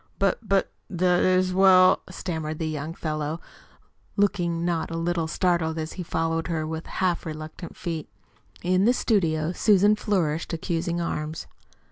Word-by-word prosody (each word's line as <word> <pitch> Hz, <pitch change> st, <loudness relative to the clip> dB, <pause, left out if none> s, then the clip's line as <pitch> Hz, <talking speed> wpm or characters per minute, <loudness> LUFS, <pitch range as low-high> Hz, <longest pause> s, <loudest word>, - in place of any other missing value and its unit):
"But 195 Hz, -1 st, +1 dB
but 195 Hz, -3 st, +1 dB, 0.2 s
that 180 Hz, -1 st, +2 dB
is 185 Hz, 0 st, +3 dB
well 185 Hz, -1 st, +6 dB
" -, -, -17 dB
stammered 160 Hz, -4 st, -4 dB
the 160 Hz, -, -2 dB
young 155 Hz, +1 st, -4 dB
fellow, 155 Hz, 0 st, -3 dB, 0.8 s
looking 175 Hz, -5 st, +1 dB
not 170 Hz, -2 st, -1 dB
a 165 Hz, -, -4 dB
little 165 Hz, -1 st, -1 dB
startled 165 Hz, -1 st, 0 dB
as 160 Hz, 0 st, -4 dB
he 185 Hz, -, -6 dB
followed 165 Hz, -1 st, -1 dB
her, 160 Hz, -3 st, -1 dB
with 160 Hz, +1 st, -5 dB
half 180 Hz, -2 st, 0 dB
reluctant 155 Hz, +2 st, -7 dB
feet. 165 Hz, -3 st, -4 dB, 0.5 s
In 185 Hz, +2 st, +3 dB
the 245 Hz, -, +5 dB
studio 165 Hz, -10 st, +1 dB
Susan 205 Hz, +2 st, +4 dB
flourished 170 Hz, -7 st, -1 dB
accusing 170 Hz, 0 st, -2 dB
arms. 155 Hz, -2 st, -3 dB
170 Hz, 150 wpm, -25 LUFS, 160-185 Hz, 0.8 s, well